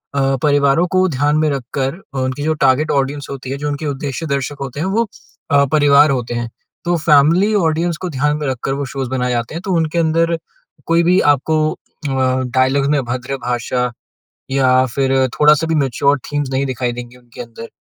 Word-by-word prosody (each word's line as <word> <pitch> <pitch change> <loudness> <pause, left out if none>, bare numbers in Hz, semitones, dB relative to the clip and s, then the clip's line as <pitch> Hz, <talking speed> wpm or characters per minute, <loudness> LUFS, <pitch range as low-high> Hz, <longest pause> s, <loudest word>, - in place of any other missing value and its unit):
अ, 135 0 +2
परिवारों 145 +3 +3
को 185 0 +4
ध्यान 145 +2 +1
में 155 0 +2
रखकर 135 +2 -3 0.2
अ, - - -3
उनकी 130 +2 -2
जो 155 +1 +1
टारगेट 135 +4 +3
ऑडियन्स 140 +1 -1
होती 135 -2 -7
है। 140 - -3
जो 150 +1 -4
उनके 145 +2 -4
उद्देश्य 140 +2 -4
दर्शक 140 +1 -4
होते 135 +1 -5
हैं 175 - -1
वो 225 +4 0 0.4
अ, 140 0 +5
परिवार 145 0 +5
होते 120 -3 -2
हैं। 120 -1 -3 0.4
तो 175 0 +1
फ़ैमिली 165 +6 +4
ऑडियन्स 165 -2 +1
को 185 +1 -5
ध्यान 150 +1 0
में 150 - -3
रखकर 130 +1 -2
वो - - -1
शोज़ 135 -2 -4
बनाए 125 -1 -1
जाते 120 +4 -2
हैं। 170 - -4
तो 190 - -1
उनके 165 0 0
अंदर 165 +1 +1 0.5
कोई 165 +1 +3
भी 180 +2 +4 0.2
आपको 155 +3 -1
अ, - - -17 0.8
डायलॉग 130 +2 +2
में 150 - +3
अभद्र 130 +2 -4
भाषा 125 0 -1 0.6
या 130 -1 +3
फ़िर 135 -1 +1 0.3
थोड़ा-सा 150 +1 +5
भी 165 - +1
मैच्योर 140 +1 +1
थीम्स 145 -2 -1
नहीं 135 +1 0
दिखाई 125 -2 -2
देंगे 120 +1 -8
उनके 120 -1 -14
अंदर। 115 -1 -10
140 Hz, 195 wpm, -17 LUFS, 130-155 Hz, 0.8 s, अ